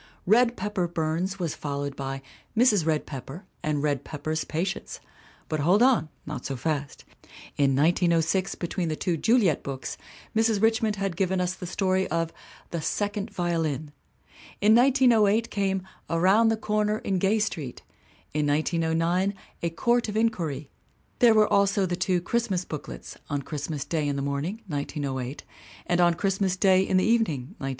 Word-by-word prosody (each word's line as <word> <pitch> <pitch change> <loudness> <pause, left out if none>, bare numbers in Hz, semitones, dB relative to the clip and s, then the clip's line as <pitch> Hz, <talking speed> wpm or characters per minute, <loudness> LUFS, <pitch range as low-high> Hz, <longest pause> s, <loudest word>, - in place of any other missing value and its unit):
Red 235 +4 +4
Pepper 190 -3 -1
Burns 170 +3 -2
was 170 -5 -2
followed 140 -1 -4
by 135 0 -5 0.3
Mrs. 210 -9 +4
Red 155 -2 +1
Pepper 140 - -8 0.2
and 150 -1 -1
Red 145 -3 0
Pepper's 155 +1 -3
Patients. 180 +5 -3 0.5
But 155 - -2
hold 180 +10 +4
on 250 -11 +3 0.2
not 150 - -5
so 135 - -3
fast. 145 +1 -3 0.5
In 140 -2 +2
1906, 170 +4 +2
between 175 0 -3
the 155 - -1
two 175 +2 -1
Juliet 205 - +3
books, 135 -1 -6 0.4
Mrs. 225 -1 +3
Richmond 220 0 +2
had 195 -3 -2
given 190 +1 0
us 180 0 0
the 185 -1 -7
story 190 +1 +1
of 165 0 -1 0.4
The 170 - -2
Second 205 +5 -2
Violin. 165 -6 -2 0.7
In 210 +2 +5
1908 230 -4 +4
came 195 -2 0 0.3
Around 190 +7 +4
the 225 0 +2
Corner 215 0 0
in 195 -3 -1
Gay 195 +4 +2
Street, 165 - -3 0.5
in 150 0 +1
1909 165 +5 +1 0.3
A 170 - 0
Court 235 +7 +1
of 210 - -3
Inquiry; 165 -11 -1 0.5
there 235 -2 +6
were 215 -1 +5
also 200 0 +3
the' 180 -1 -1
two 185 0 +1
Christmas 195 -3 -1
booklets 150 - -8
On 145 -2 -2
Christmas 145 0 -4
Day 155 -3 -1
in 145 - -1
the 140 - -2
Morning 150 +11 -3
(1908) 140 -4 -4 0.4
and 175 0 +2
On 175 -1 +4
Christmas 190 0 0
Day 190 -1 +5
in 190 0 +1
the 185 - +3
Evening 190 - +1
(1910). 135 - -3
180 Hz, 160 wpm, -26 LUFS, 155-205 Hz, 0.7 s, there